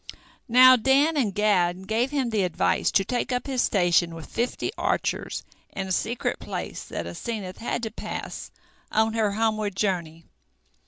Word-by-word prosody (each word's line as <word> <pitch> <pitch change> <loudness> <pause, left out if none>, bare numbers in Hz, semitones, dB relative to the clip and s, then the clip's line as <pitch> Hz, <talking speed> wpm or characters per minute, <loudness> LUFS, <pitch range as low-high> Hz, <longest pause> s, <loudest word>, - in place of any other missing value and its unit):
Now 255 +2 +8
Dan 275 +6 +3
and 245 -8 +1
Gad 190 -3 +1
gave 230 +4 +1
him 270 -5 -1
the 215 -2 +1
advice 180 -3 +1
to 195 - +2
take 245 +3 -2
up 250 0 -1
his 265 -3 0
station 175 -3 +2
with 165 -2 -8
fifty 240 +2 -2
archers - - -1 0.3
in 195 - -3
a - - -5
secret 230 +6 -1
place - - -5
that - - -5
Asenath 205 -6 -5
had 235 +1 -3
to 220 - -3
pass - - -6 0.4
on 220 0 +2
her 215 -3 +1
homeward 215 -2 0
journey. 170 -5 -2
215 Hz, 160 wpm, -25 LUFS, 190-245 Hz, 0.4 s, Now